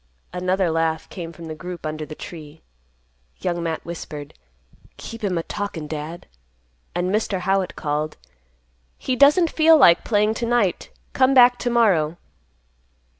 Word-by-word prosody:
Another 185 0 0
laugh 160 0 -1
came 170 -3 -7
from 170 0 -11
the 160 - -6
group 175 +2 -8
under 155 0 -4
the 155 - -8
tree. 155 -2 -10 0.7
Young 175 -2 -2
Matt 165 -1 -3
whispered, 150 -3 -7 0.6
"Keep 230 -1 -9
him 185 -4 0
a 165 - -2
talkin', 200 -6 -5
Dad;" 155 +2 -6 0.7
and 180 +1 0
Mr. 210 -3 0
Howitt 190 0 0
called, 150 +1 -3 0.8
"He 260 - -2
doesn't 295 +6 +5
feel 320 0 +6
like 170 - +6
playing 210 -1 +2
to 235 - -1
night. 230 -6 0 0.2
Come 265 +1 +3
back 245 -1 +6
to 245 - -1
morrow." 185 -10 +2
180 Hz, 145 wpm, -22 LUFS, 160-225 Hz, 0.8 s, feel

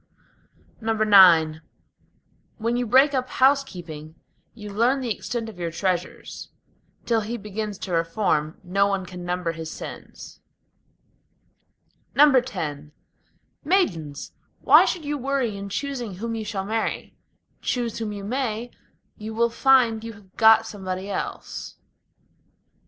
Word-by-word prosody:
IX 195 -8 +6 1.0
When 230 +2 -1
you 245 0 -1
break 265 +5 +5
up 255 -1 -1
housekeeping, 175 - 0 0.4
you 210 -3 -8
learn 240 +6 +2
the 245 -4 -1
extent 235 -2 -4
of 210 -5 -10
your 170 -1 -2
treasures; 180 +1 -3 0.6
Till 230 -2 +2
he 225 +3 -4
begins 210 -1 -5
to 190 - -7
reform, 165 -2 0
no 195 +2 +2
one 195 -2 -1
can 180 0 -9
number 175 -1 -2
his 160 -1 -7
sins. - - -9 1.8
X 265 -3 +5 1.1
Maidens! 170 - 0 0.3
why - - +7
should 335 -4 -2
you 290 0 -2
worry 265 -4 -1
in 200 0 -6
choosing 245 -3 -4
whom 230 +5 -4
you 220 -1 -4
shall 195 -2 -3
marry? 220 +2 -3 0.5
Choose 240 -3 -2
whom 220 -2 -3
you 200 -1 -6
may, 240 0 -3 0.5
you 220 +1 -7
will 235 +1 +2
find 240 -3 +3
you 230 0 -6
have 200 -3 -19
got 225 0 +6
somebody 190 -2 -5
else. - - -5
215 Hz, 125 wpm, -24 LUFS, 185-240 Hz, 1.8 s, why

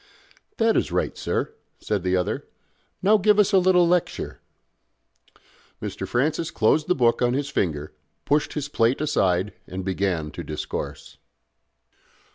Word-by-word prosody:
"That 225 0 +3
is - - +1
right, - - -1
sir," - - -2 0.2
said 105 -3 -2
the 90 +1 +1
other. 90 - -2 0.6
"Now 210 +3 +5
give 210 +1 +4
us 210 0 +3
a 190 - +7
little 180 -1 +4
lecture." 175 0 -1 1.4
Mr. - - -5
Francis 155 +6 0
closed 145 +8 +2
the 180 - +2
book 120 -3 +2
on 120 0 +2
his 140 0 -2
finger, 75 - -2 0.3
pushed 150 +1 +1
his 145 -2 -3
plate 120 -3 +1
aside, 95 -10 +1
and 95 0 -6
began 95 -5 -1
to - - -7
discourse. 75 -1 -6
130 Hz, 140 wpm, -24 LUFS, -, 1.4 s, a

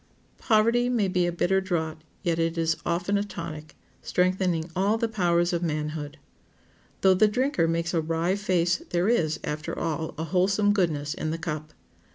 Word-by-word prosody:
Poverty 230 +2 +3
may 230 -5 +1
be 180 -1 +1
a - - 0
bitter 190 +3 +1
draught, 160 -4 -3 0.2
yet 170 -3 0
it 165 0 0 0.3
often 180 +4 +1
is - - 0
a - - -9
tonic, 155 -5 -7 0.3
strengthening 180 -2 0
all 200 +4 +2
the 230 0 0
powers 175 -5 +1
of 170 - 0
manhood. 150 -2 -3 0.8
Though 190 -1 +6
the 190 +4 +4
drinker 250 - +1
makes 170 +1 -1
a 165 - +2
wry 165 +3 0
face 180 -4 +1
there 175 +2 +1
is, 160 -9 +1
after 155 +2 -4
all, 160 -1 -3
a 160 - -2
wholesome 195 +4 +2
goodness 155 -7 0
in 155 - -3
the 160 - -2
cup. 155 -3 -5
175 Hz, 175 wpm, -26 LUFS, 160-195 Hz, 0.8 s, Though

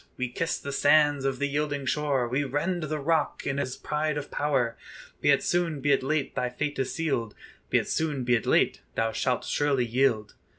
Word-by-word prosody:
We 125 -1 -2
kiss 165 +7 -1
the 140 - -6
sands 145 -1 +4
of 135 -1 0
the 145 - 0
yielding 145 -1 -2
shore, 140 -3 0
We 130 +4 0
rend 150 +7 -1
the 155 0 -2
rock 150 +1 0
in 135 0 -1
his 130 -2 -3
pride 150 0 -1
of 145 0 -6
power: 135 -6 0 0.5
Be - - +2
it 140 - +4
soon, 170 -4 0
be 145 +1 +1
it 140 - +4
late, 145 +2 -1
thy 125 - -1
fate 145 +4 -3
is 135 - -1
sealed; 135 -10 -2 0.3
Be - - +3
it - - -1
soon, 150 -5 -1
be 125 0 +2
it 115 - +1
late, - - +3
thou 115 0 +1
shalt 125 +2 -1
surely 140 -4 +1
yield." 115 -3 +1
140 Hz, 210 wpm, -27 LUFS, 130-150 Hz, 0.5 s, sands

